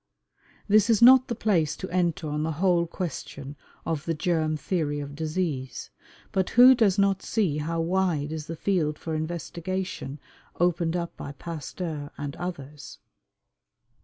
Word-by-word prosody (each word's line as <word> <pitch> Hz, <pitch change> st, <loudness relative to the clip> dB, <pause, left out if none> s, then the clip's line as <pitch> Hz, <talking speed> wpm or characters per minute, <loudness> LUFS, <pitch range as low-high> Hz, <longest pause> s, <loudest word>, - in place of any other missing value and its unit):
This 210 Hz, +1 st, +4 dB
is 225 Hz, -3 st, +4 dB
not 255 Hz, +1 st, +8 dB
the 235 Hz, -, -2 dB
place 175 Hz, -9 st, +1 dB
to 190 Hz, -, -5 dB
enter 175 Hz, -3 st, 0 dB
on 150 Hz, 0 st, -2 dB
the 160 Hz, +1 st, -1 dB
whole 175 Hz, +1 st, +2 dB
question 145 Hz, -5 st, -6 dB, 0.3 s
of 160 Hz, -2 st, -2 dB
the 165 Hz, -, -1 dB
germ 155 Hz, -1 st, 0 dB
theory 145 Hz, -1 st, -1 dB
of 145 Hz, 0 st, -6 dB
disease, 155 Hz, -3 st, -3 dB, 0.4 s
but 190 Hz, -1 st, 0 dB
who 250 Hz, +2 st, +8 dB
does 220 Hz, -6 st, +3 dB
not 200 Hz, -1 st, +2 dB
see 180 Hz, -10 st, 0 dB
how 165 Hz, +2 st, -2 dB
wide 165 Hz, -4 st, 0 dB
is 155 Hz, -1 st, -5 dB
the 165 Hz, -, -5 dB
field 160 Hz, -4 st, 0 dB
for 160 Hz, -, -5 dB
investigation 170 Hz, -1 st, -4 dB, 0.4 s
opened 170 Hz, -1 st, +1 dB
up 170 Hz, -1 st, -3 dB
by 140 Hz, -, -7 dB
Pasteur 155 Hz, 0 st, -6 dB
and 145 Hz, 0 st, -5 dB
others? 150 Hz, -5 st, -7 dB
165 Hz, 150 wpm, -26 LUFS, 150-185 Hz, 0.4 s, not